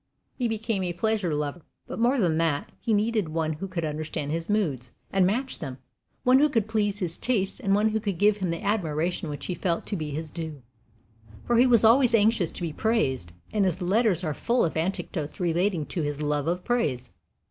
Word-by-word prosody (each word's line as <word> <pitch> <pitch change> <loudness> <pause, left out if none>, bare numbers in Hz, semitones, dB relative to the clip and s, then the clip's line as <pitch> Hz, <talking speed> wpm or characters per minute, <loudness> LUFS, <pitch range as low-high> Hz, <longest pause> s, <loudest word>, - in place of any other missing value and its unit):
He 245 - 0
became 225 -2 -2
a 175 -1 -2
pleasure 200 -3 0
lover; 150 +3 -3 0.2
but - - -6
more 245 +4 +3
than 170 -8 +2
that, 160 -3 0
he 230 - -2
needed 215 -3 +1
one 160 0 -1
who 170 +6 -5
could 175 -3 -3
understand 150 -1 -3
his 165 +3 -3
moods 145 - 0 0.2
and 190 -2 +4
match 255 +7 -1
them, 135 -5 -6 0.5
one 255 +1 +6
who 300 +1 +4
could 225 -7 +1
please 210 -2 0
his 175 -5 -3
tastes, 205 -7 0
and 195 0 +2
one 210 +2 +3
who 220 0 0
could 200 -5 -3
give 205 +2 +4
him 190 -3 -2
that 170 +5 -3
admiration 175 -5 -1
which 145 - -5
he 180 - -2
felt 170 -1 -1
to 205 - -3
be 155 -4 -3
his 155 +1 -5
due; 160 -5 -6 0.8
for 240 - +2
he 250 +2 +6
was 235 -3 +5
always 235 +1 +6
anxious 215 -5 +3
to - - -6
be 165 -3 -2
praised, 135 - 0 0.2
and 210 -2 +2
his 185 -2 0
letters 190 0 +2
are 155 -3 -1
full 240 - +1
of 165 - -3
anecdotes 160 -2 -3
relating 175 -1 +1
to 170 - -3
his 145 -1 -2
love 150 0 0
of 180 +2 -1
praise. 140 - -1
180 Hz, 215 wpm, -26 LUFS, 155-220 Hz, 0.8 s, one